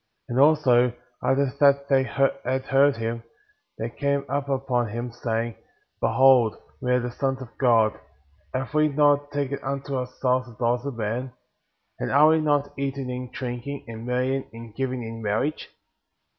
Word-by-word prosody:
And 120 +2 -1
also, 130 -5 +4 0.3
after 135 -1 +2
that 140 -1 +4
they 135 -1 +4
had 130 0 0
heard 140 -1 +4
him, 115 +1 -3 0.6
they - - -4
came 140 -1 -1
up 140 +1 -2
before 130 -3 0
him, 120 +3 -5
saying: 115 -1 -3 0.4
Behold, 130 -4 +4 0.3
we 125 -1 -1
are 125 - +4
the 125 0 -4
sons 135 +1 -1
of 120 -3 -11
God;^ 115 -4 +3 0.5
have 130 +3 -4
we 155 0 +4
not 145 0 +3
taken 140 -1 -2
unto 140 +1 -3
ourselves 125 0 -1
the 120 - -13
daughters 120 +3 0
of 135 -4 -5
men? 120 +4 -3 0.7
And - - -2
are 150 +3 +6
we 160 0 +3
not 145 -2 +1
eating 135 -2 -3
and 125 0 -6
drinking, 130 +3 -5
and 115 0 -8
marrying 125 +2 -1
and 115 -1 -11
giving 130 0 -3
in 115 0 -7
marriage? 110 +9 -1
130 Hz, 160 wpm, -25 LUFS, 120-140 Hz, 0.7 s, are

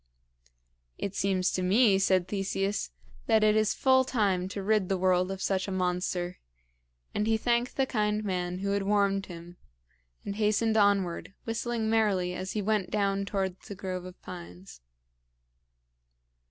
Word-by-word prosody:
"It 200 - -4
seems 190 -2 +1
to 185 - -1
me," 195 +2 +4
said 185 -2 +2
Theseus, 195 0 -2 0.4
"that 220 -1 +4
it 215 0 +4
is 215 -1 +2
full 260 -1 +4
time 200 -8 0
to 195 +1 -5
rid 210 -2 +1
the 195 - +1
world 185 0 +2
of 195 0 -4
such 190 -1 0
a - - -4
monster;" 180 -1 -1 0.7
and 210 +1 0
he 225 0 +3
thanked 240 +2 0
the 270 - +3
kind 210 -3 0
man 180 -2 -2
who 200 - -1
had 200 0 +1
warned 195 -1 +1
him, 175 0 -10 0.7
and 200 0 -4
hastened 215 +1 +2
onward, 200 -3 +1
whistling 230 0 -2
merrily 205 -5 +1
as 185 +1 -5
he 210 - -2
went 210 -2 0
down 200 -1 0
towards 190 -2 -3
the 200 - -7
grove 185 -2 -5
of 185 0 -11
pines. 90 -5 -10
195 Hz, 155 wpm, -29 LUFS, 185-215 Hz, 0.7 s, me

